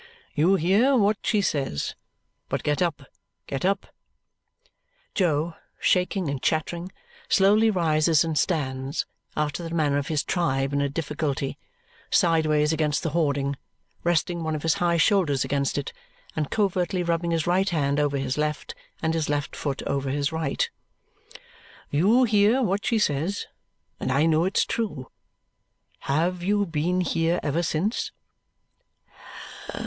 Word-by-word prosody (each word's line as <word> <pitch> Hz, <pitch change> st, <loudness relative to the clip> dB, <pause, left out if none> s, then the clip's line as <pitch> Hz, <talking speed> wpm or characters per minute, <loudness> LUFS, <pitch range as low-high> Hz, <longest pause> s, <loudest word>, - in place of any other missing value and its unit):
"You 170 Hz, +6 st, +4 dB
hear 200 Hz, -, +3 dB
what 205 Hz, -1 st, +2 dB
she 210 Hz, -3 st, +1 dB
says. 135 Hz, -, -1 dB, 0.6 s
But -, -, -2 dB
get 150 Hz, +3 st, 0 dB
up, 165 Hz, -5 st, 0 dB, 0.4 s
get 135 Hz, -1 st, -4 dB
up!" 195 Hz, +2 st, +1 dB, 1.3 s
Jo, 165 Hz, -3 st, +1 dB, 0.3 s
shaking 180 Hz, -1 st, +1 dB
and 140 Hz, -2 st, -3 dB
chattering, 170 Hz, +3 st, -1 dB, 0.4 s
slowly 210 Hz, +3 st, +5 dB
rises 160 Hz, -4 st, +3 dB
and 160 Hz, -1 st, -2 dB
stands, 140 Hz, -4 st, -1 dB, 0.3 s
after 150 Hz, +2 st, -1 dB
the 165 Hz, 0 st, -5 dB
manner 145 Hz, -3 st, +2 dB
of 140 Hz, -, -4 dB
his 150 Hz, -3 st, 0 dB
tribe 135 Hz, -6 st, 0 dB
in 140 Hz, -, +1 dB
a 140 Hz, -, 0 dB
difficulty, 145 Hz, -2 st, -2 dB, 0.5 s
sideways 155 Hz, -2 st, +3 dB
against 150 Hz, -2 st, 0 dB
the 160 Hz, -, -1 dB
hoarding, 140 Hz, -4 st, 0 dB, 0.5 s
resting 170 Hz, 0 st, +1 dB
one 160 Hz, -1 st, -1 dB
of 150 Hz, -, -5 dB
his 165 Hz, -1 st, +3 dB
high 170 Hz, -1 st, +3 dB
shoulders 165 Hz, -, +3 dB
against 140 Hz, -1 st, -1 dB
it 145 Hz, -, -3 dB, 0.4 s
and 150 Hz, -2 st, -1 dB
covertly 185 Hz, -3 st, 0 dB
rubbing 170 Hz, 0 st, 0 dB
his 165 Hz, -2 st, 0 dB
right 185 Hz, +3 st, +2 dB
hand 145 Hz, -3 st, 0 dB
over 145 Hz, -1 st, +1 dB
his 135 Hz, +1 st, -2 dB
left 150 Hz, -1 st, -2 dB, 0.3 s
and 160 Hz, 0 st, +1 dB
his 160 Hz, -3 st, -1 dB
left 145 Hz, 0 st, -2 dB
foot 140 Hz, -2 st, -3 dB
over 140 Hz, -1 st, -1 dB
his 140 Hz, +1 st, 0 dB
right. 160 Hz, -, -1 dB, 1.2 s
"You 205 Hz, -, +4 dB
hear 220 Hz, +3 st, +4 dB
what 200 Hz, -2 st, 0 dB
she 230 Hz, -, +2 dB
says, 170 Hz, +1 st, 0 dB, 0.5 s
and -, -, -2 dB
I 140 Hz, +4 st, +3 dB
know 160 Hz, +1 st, +3 dB
it's 190 Hz, -, +2 dB
true. 155 Hz, -, -3 dB, 0.9 s
Have 170 Hz, +5 st, 0 dB
you 205 Hz, +3 st, +1 dB
been 170 Hz, +2 st, 0 dB
here 165 Hz, -1 st, +1 dB
ever 150 Hz, +3 st, 0 dB
since?" 175 Hz, +7 st, -1 dB
160 Hz, 145 wpm, -25 LUFS, 145-180 Hz, 1.3 s, slowly